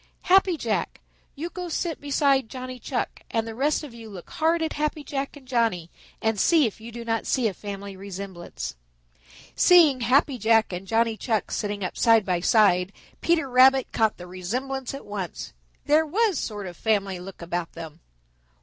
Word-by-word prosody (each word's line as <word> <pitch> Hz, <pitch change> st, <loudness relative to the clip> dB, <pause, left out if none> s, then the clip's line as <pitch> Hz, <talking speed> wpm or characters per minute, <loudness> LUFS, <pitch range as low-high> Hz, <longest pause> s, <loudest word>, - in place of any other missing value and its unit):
Happy 375 Hz, -2 st, +4 dB
Jack, 225 Hz, -7 st, -2 dB, 0.4 s
you 315 Hz, +5 st, -4 dB
go 360 Hz, -1 st, -6 dB
sit 330 Hz, 0 st, -3 dB
beside 280 Hz, -4 st, +2 dB
Johnny 255 Hz, -1 st, -7 dB
Chuck, 245 Hz, +1 st, -3 dB
and 225 Hz, -1 st, -1 dB
the 225 Hz, -, -6 dB
rest 290 Hz, +7 st, 0 dB
of 285 Hz, -5 st, -9 dB
you 230 Hz, -1 st, -10 dB
look 185 Hz, -4 st, -11 dB
hard 325 Hz, +1 st, +1 dB
at 320 Hz, -, -2 dB
Happy 300 Hz, 0 st, -2 dB
Jack 280 Hz, 0 st, -4 dB
and 265 Hz, -3 st, -16 dB
Johnny 225 Hz, -9 st, 0 dB, 0.3 s
and 220 Hz, -2 st, +1 dB
see 320 Hz, -, +4 dB
if 220 Hz, -1 st, -4 dB
you 230 Hz, +1 st, -9 dB
do 235 Hz, 0 st, -8 dB
not 225 Hz, -1 st, -1 dB
see 250 Hz, -3 st, +2 dB
a 205 Hz, -, -2 dB
family 200 Hz, 0 st, -7 dB
resemblance." 190 Hz, -, -7 dB, 0.8 s
Seeing 325 Hz, -7 st, +6 dB
Happy 260 Hz, +2 st, +2 dB
Jack 220 Hz, -1 st, +3 dB
and 180 Hz, +2 st, -6 dB
Johnny 225 Hz, 0 st, +1 dB
Chuck 220 Hz, -3 st, -1 dB
sitting 205 Hz, -2 st, -3 dB
up 185 Hz, -, -3 dB
side 225 Hz, -3 st, +4 dB
by 180 Hz, -2 st, 0 dB
side, 185 Hz, -2 st, +3 dB, 0.3 s
Peter 335 Hz, -4 st, +2 dB
Rabbit 260 Hz, +1 st, +5 dB
caught 220 Hz, -1 st, +1 dB
the 180 Hz, -, -9 dB
resemblance 250 Hz, +10 st, -4 dB
at 275 Hz, -, -9 dB
once. 195 Hz, -, -6 dB, 0.3 s
There 310 Hz, +2 st, +3 dB
was 415 Hz, +3 st, +1 dB
sort 205 Hz, -3 st, -4 dB
of 180 Hz, -1 st, -7 dB
family 200 Hz, -4 st, 0 dB
look 180 Hz, -1 st, -10 dB
about 170 Hz, 0 st, -3 dB
them. 160 Hz, -1 st, -9 dB
230 Hz, 180 wpm, -25 LUFS, 195-275 Hz, 0.8 s, Seeing